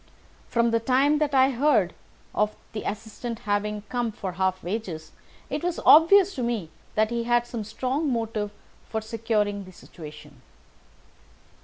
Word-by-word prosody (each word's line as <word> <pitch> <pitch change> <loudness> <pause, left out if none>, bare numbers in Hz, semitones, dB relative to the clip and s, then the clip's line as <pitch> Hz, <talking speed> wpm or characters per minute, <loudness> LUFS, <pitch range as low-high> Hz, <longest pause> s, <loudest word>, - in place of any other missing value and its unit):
From 235 0 +2
the 230 - +3
time 270 +5 +3
that 295 -2 +1
I 265 +1 +5
heard 240 - +2 0.4
of 210 0 +1 0.2
the 215 - -3
assistant 220 +3 -6
having 210 0 -1
come 240 -2 -1
for 195 -3 -5
half 185 +1 -1
wages, 175 -5 -4 0.4
it 295 +3 -3
was 355 -1 -1
obvious 380 +5 +7
to 255 - -4
me 230 -9 -2 0.2
that 215 +1 +2
he 235 -1 -1
had 240 0 +3
some 235 -2 -5
strong 260 +7 -1
motive 225 -3 -1 0.4
for 220 - -1
securing 215 -2 -1
the 185 - -12
situation." 155 -3 -12
225 Hz, 150 wpm, -26 LUFS, 205-255 Hz, 0.4 s, obvious